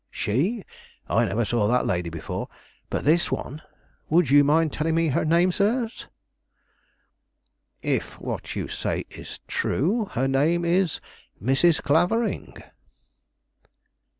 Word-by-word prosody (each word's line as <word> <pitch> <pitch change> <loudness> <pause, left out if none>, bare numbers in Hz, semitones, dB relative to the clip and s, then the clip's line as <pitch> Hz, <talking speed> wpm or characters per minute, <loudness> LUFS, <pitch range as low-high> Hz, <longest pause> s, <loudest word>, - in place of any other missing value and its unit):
"She? 180 - -1 0.4
I - - +2
never 115 +3 0
saw 110 -2 +1
that 125 +3 +2
lady 90 -1 -1
before; 80 -1 -5 0.4
but - - -3
this 165 +4 +3
one 150 +4 -4 0.5
would 160 -3 +3
you 145 0 +7
mind 155 +1 +2
telling 160 +1 0
me 165 -1 +2
her 130 - +1
name, 170 +3 +3
sirs?" 225 +5 -1 1.8
"If - - -2
what - - -5
you - - -3
say - - -3
is - - -9
true, 220 +1 0
her 130 +3 +1
name 155 +6 +2
is 175 0 +1 0.4
Mrs. 135 - +2
Clavering." 180 +10 0
160 Hz, 125 wpm, -25 LUFS, 135-175 Hz, 1.8 s, you